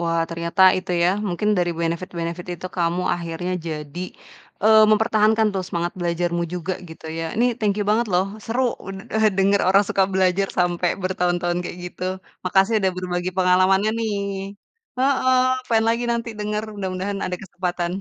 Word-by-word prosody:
wah 165 -1 0
ternyata 170 +3 0 0.2
itu 185 0 -7
ya 175 - +4 0.2
mungkin 180 +4 -1
dari 175 -1 +1
benefit-benefit 170 0 -3
itu 185 - -5
kamu 175 +1 0
akhirnya 170 +1 -4
jadi, 155 +1 -5 0.6
eee, 220 +1 +7
mempertahankan 220 0 +3
tuh 190 - -1
semangat 170 0 -2
belajarmu 170 0 0
juga 180 +1 -3
gitu 160 0 -11
ya. 165 - -2
Ini 235 - +4
thank 210 -3 +1
you 205 - 0
banget 230 +2 +2
loh, 180 +1 +3 0.2
seru 240 +3 0 0.2
sudah 195 +3 -4
denger 195 +1 +3
orang 195 +2 +5
suka 195 - +2
belajar 190 +1 +2
sampai 175 0 +1
bertahun 180 -1 0
tahun 175 0 0
kayak 175 - -6
gitu. 180 - -10 0.4
Makasih 195 +4 +3
udah 190 - +3
berbagi 180 0 -2
pengalamannya 185 +3 +4
nih. 225 -2 -1 0.9
Heeh, 255 -1 +2
pengen 225 -1 +3
lagi 235 +1 0
nanti 235 0 -2
denger, 210 0 -2
mudah-mudahan 195 0 -3
ada 180 - -3
kesempatan. 180 -2 -3
185 Hz, 160 wpm, -22 LUFS, 175-210 Hz, 0.9 s, eee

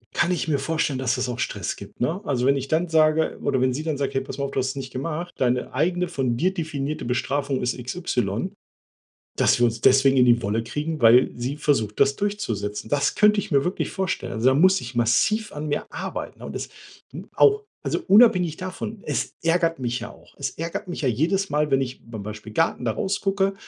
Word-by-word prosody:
Kann 175 - +2
ich 175 -2 -1
mir 145 -3 +1
vorstellen, 150 -1 -1
dass 130 -1 0
das 125 0 -2
auch 125 0 -4
Stress 100 -5 -2
gibt, 100 - -12
ne? 165 +10 -1
Also 125 -3 -1
wenn 140 +1 +4
ich 135 0 -4
dann 165 +3 +1
sage 160 -1 +2
oder 130 - +1
wenn 130 0 +2
sie 150 +5 -4
dann 155 -3 -2
sagt: 140 0 -2
„Hey, 135 - 0
pass 135 - -7
mal, 140 0 -2
du - - -7
hast 130 0 0
es 135 - -5
nicht 130 -1 -6
gemacht, 165 +6 -4
deine 125 -1 0
eigene 180 +2 0
von 135 -8 -1
dir 185 +8 +1
definierte 155 -4 -3
Bestrafung 135 +3 -1
ist 125 +1 -1
x, 125 +3 -6 0.2
y“, 100 -5 -1 0.8
dass - - +3
wir 120 - +6
uns 115 -1 -2
deswegen 135 +1 +5
in 125 - +6
die 120 -1 +4
Wolle 110 +3 -1
kriegen, 150 +5 -4
weil 120 +2 +6
sie 125 +4 -3
versucht, 110 -9 0
das 140 - +4
durchzusetzen. 110 - -3
Das 145 0 +1
könnte 210 0 +4
ich 200 - -2
mir 140 -1 +3
wirklich 180 - -2
vorstellen. 190 -2 -2
Also 115 +3 +2
da 130 - +4
muss 185 +6 +5
ich 120 0 -8
massiv 210 - +2
an 150 +1 -5
mir 145 - -2
arbeiten - - -6
und - - -7
das - - -4 0.4
hm, - - -9
auch 425 0 +5 0.2
also - - -2
unabhängig 195 -7 +5
davon, 185 +4 -6
es - - -2
ärgert 165 -1 +1
mich 125 -1 -2
ja - - -7
auch. - - -20
Es - - -3
ärgert 165 +3 -5
mich 175 - -5
ja 135 - +2
jedes 170 - +1
Mal, 150 0 0
wenn 135 0 +3
ich 130 -1 -4
bei 115 -1 -8
Beispiel 105 +1 -8
Garten 165 -1 0
da 115 - +1
rausgucke, 195 - 0
140 Hz, 225 wpm, -24 LUFS, 125-165 Hz, 0.8 s, wir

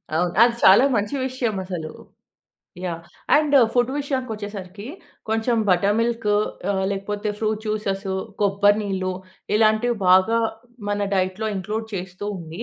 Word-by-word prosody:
అవును. 175 +1 +1
అది 235 0 +5
చాలా 195 +6 +8
మంచి 205 +6 -1
విషయం 250 -4 -2
అసలు. 175 -4 -5 0.9
యాహ్! 170 -2 -3 0.4
అండ్ 295 -1 +2 0.2
ఫుడ్ 245 +1 +2
విషయానికొచ్చేసరికి 215 -8 -5 0.4
కొంచెం 225 +2 +1
బటర్‌మిల్క్ 210 +4 +1 0.4
ఆహ్, 190 -1 0
లేకపోతే 205 +2 -3
ఫ్రూట్ 215 0 -1
జ్యూసెసు, 200 -2 -2 0.3
కొబ్బరి 205 +1 +3
నీళ్ళు 190 -2 -2 0.4
ఇలాంటివి 220 +2 +3
బాగా 190 +5 +5 0.5
మన 205 0 0
డైట్‌లో 190 +3 -1
ఇంక్లూడ్ 215 +4 -3
చేస్తూ 185 +1 -6
ఉండి 165 0 -7
205 Hz, 120 wpm, -22 LUFS, 190-225 Hz, 0.9 s, చాలా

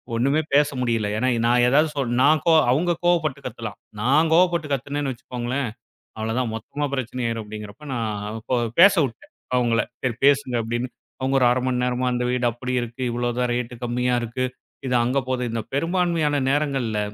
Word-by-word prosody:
ஒண்ணுமே 140 +6 +2
பேச 145 +1 +5
முடியல. 115 -4 0
ஏன்னா, 130 +3 +1 0.2
நான் 120 0 +4
எதாவது 150 +4 +4
சொன்னா 125 -4 -1
நான் 155 +2 +4
கோ 165 - +5 0.2
அவங்க 170 +5 +2
கோவப்பட்டு 155 -6 +1
கத்தலாம். 110 -3 -7 0.2
நான் 150 +7 +3
கோவப்பட்டு 170 -2 +3
கத்துனேன்னு 140 +1 -2
வெச்சுக்கோங்களேன், 125 +2 -3 0.5
அவ்ளோதான் 110 +2 -1
மொத்தமா 145 +7 -4
பிரச்சனை 125 -1 -3
ஆயிரும் 115 -1 -3
அப்டிங்கிறப்ப, 105 +4 -9
நான் 110 -3 -2
பேச 115 +3 -5
அவ 115 - -1
பேசவிட்டேன் 165 - +4 0.2
அவங்கள. 120 -1 +2 0.2
சரி 125 -3 -1
பேசுங்க 140 -3 +3
அப்டின்னு. 120 +3 -2 0.3
அவங்க 135 +1 0
ஒரு 125 - +4
1/2 125 - +2
மணி 125 -1 0
நேரமா, 125 0 0
"அந்த 125 0 -1
வீடு 125 -1 0
அப்டி 125 +2 -5
இருக்கு. 120 +2 -5
இவ்ளோதான் 120 +1 -1
ரேட்டு 125 0 -3
கம்மியா 125 +1 0
இருக்கு. 120 +2 -3 0.4
இது 125 - +1
அங்க 125 +3 +1
போகுது." 130 -1 -1
இந்த 115 - -2
பெரும்பான்மையான 165 -2 +1
நேரங்கள்ல, 135 -6 0
125 Hz, 170 wpm, -23 LUFS, 120-145 Hz, 0.5 s, பேச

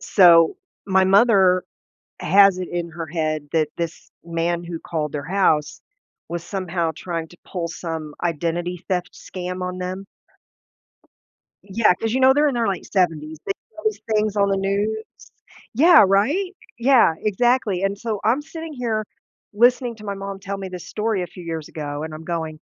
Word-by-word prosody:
So, 170 - +6 0.3
my 190 -1 +4
mother 190 -2 +5 0.6
has 195 +2 +5
it 180 - -4
in 170 -1 -3
her 165 0 -6
head 155 -2 -2
that 155 -2 +1
this 170 0 -5
man 170 +1 -1
who 170 -1 -6
called 155 -3 -3
their 145 -1 -4
house 160 -4 +1 0.5
was 170 -1 -4
somehow 175 -3 -2
trying 165 -3 -4
to 175 - -16
pull 175 -3 -4
some 160 -2 -6
identity 175 +2 -2
theft 180 0 -2
scam 180 0 -6
on 180 0 -4
them? 185 +2 -5 1.6
Yeah, 200 0 +3
'cause 225 +3 -2
you 260 - +1
know 260 0 +6
they're 295 +1 +3
in 285 - 0
their 235 -3 0
late 195 - -2
70s. 160 -5 0
They - - -1
see - - -40
these 435 - 0
things 210 -1 +1
on 200 -1 +3
the 195 - +1
news 205 +3 -1 0.7
yeah, 325 +4 +7
right? 300 - +1 0.2
Yeah, 240 -8 +5
exactly. 215 -2 +1
And 195 +1 +1
so 215 -1 -3
I'm 245 +7 +3
sitting 320 0 -8
here 225 -4 -2 0.5
listening 240 +2 +3
to 215 - -11
my 200 -1 -3
mom 195 0 -6
tell 200 0 -5
me 195 -1 -6
this 180 -1 -8
story 215 -2 -1
a - - -6
few 180 +2 -12
years 165 -2 -5
ago, 145 -1 -5
and 155 0 -6
I'm 160 - -9
going 160 -2 -3
185 Hz, 175 wpm, -22 LUFS, 170-215 Hz, 1.6 s, yeah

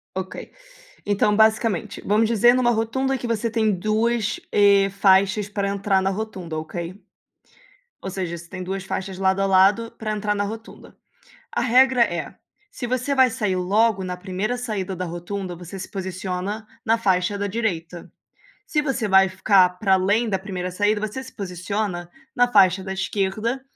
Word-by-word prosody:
OK. 190 0 -6 0.6
Então, 205 +1 +2
basicamente, 220 -2 +1
vamos 215 +2 +2
dizer 235 +2 +5
numa 250 -1 +3
rotunda 240 +4 0
que 250 - -5
você 230 0 -1
tem 220 -2 +1
duas, 215 +3 0
e, 200 -1 +5
faixas 195 +1 +3
pra 200 -1 -2
entrar 200 -1 +1
na 195 - +1
rotunda, 190 -6 -5
ok. 170 +4 -6 1.0
Ou 190 - -4
seja, 180 -2 -4
você 170 0 -12
tem 185 +1 -7
duas 190 +1 -4
faixas 190 0 -4
de 190 - -7
lado 190 0 +2
a - - +2
lado 195 +4 +3
pra 215 -1 -3
entrar 210 0 -1
na 205 0 -1
rotunda. 220 +3 -9 0.6
A - - -1
regra 255 0 +4
é, 170 -7 -2 0.4
se 245 - -5
você 255 +3 -1
vai 260 -1 +5
sair 210 -6 -1
logo 200 +2 +2
na 180 -1 -4
primeira 190 +6 -3
saída 205 -6 -4
da 185 - -3
rotunda, 175 +1 -5
você 180 +3 -9
se 190 - -7
posiciona 190 +2 -4 0.2
na 225 -1 +3
faixa 190 -2 +1
da 205 - -1
direita. 180 -6 -3 0.6
Se 300 - +1
você 265 -6 -1
vai 190 0 +5
ficar 190 0 +4
para 195 -1 +3
além 205 +5 +2
da 195 -3 0
primeira 185 -2 -5
saída, 205 +3 +1
você 260 +5 -6
se 260 - -13
posiciona 185 -1 -4 0.3
na 245 0 +3
faixa 190 -3 +4
da 190 - -4
esquerda, 210 +6 -2
200 Hz, 170 wpm, -23 LUFS, 185-220 Hz, 1.0 s, dizer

